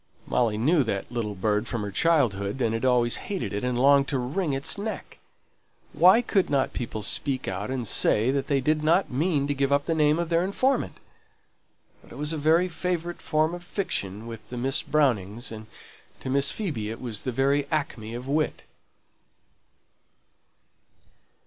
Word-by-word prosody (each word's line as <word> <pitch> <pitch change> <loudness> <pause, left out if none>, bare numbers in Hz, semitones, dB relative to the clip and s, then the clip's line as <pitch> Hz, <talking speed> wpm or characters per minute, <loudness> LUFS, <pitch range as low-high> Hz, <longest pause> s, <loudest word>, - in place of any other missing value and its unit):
Molly 115 -4 +1
knew 145 +7 +3
that 100 0 -3
little 110 -4 -3
bird 105 +3 0
from 115 -4 -3
her 100 - -4
childhood, 120 -7 +1
and 115 -3 +1
had 115 - -3
always 125 -2 +3
hated 195 - -4
it, 105 - -3
and 125 -1 -1
longed 140 +1 +5
to 140 - -1
wring 145 +7 -1
its 135 0 -1
neck. 210 +2 -6 0.7
Why 190 +7 +6
could 195 -5 +1
not 135 -2 +1
people 110 -3 -4
speak 130 +5 -1
out 95 +3 -3
and 130 -3 -2
say 110 +4 +3
that 140 -1 -1
they 140 -2 +1
did 155 +3 +1
not 170 +5 +2
mean 145 +1 +1
to 145 - 0
give 140 0 0
up 140 0 +2
the 165 - 0
name 150 -1 +3
of 170 -1 -2
their 170 0 +2
informant? 255 +8 0 1.0
But - - -19
it - - -10
was 150 +2 -2
a - - -2
very 160 +4 +3
favourite 175 0 -3
form 155 +1 +1
of 175 0 -7
fiction 110 - -3
with 110 -2 -9
the 125 - -6
Miss 130 +3 0
Brownings, 120 -7 0
and 110 -1 -8 0.5
to 130 - -4
Miss 140 +1 +3
Phoebe 145 - -3
it 115 - -6
was 115 -5 -4
the 130 - -2
very 140 +3 +1
acme 130 -8 -3
of 125 +2 -7
wit. 150 +2 -1
135 Hz, 180 wpm, -26 LUFS, 115-155 Hz, 1.0 s, Why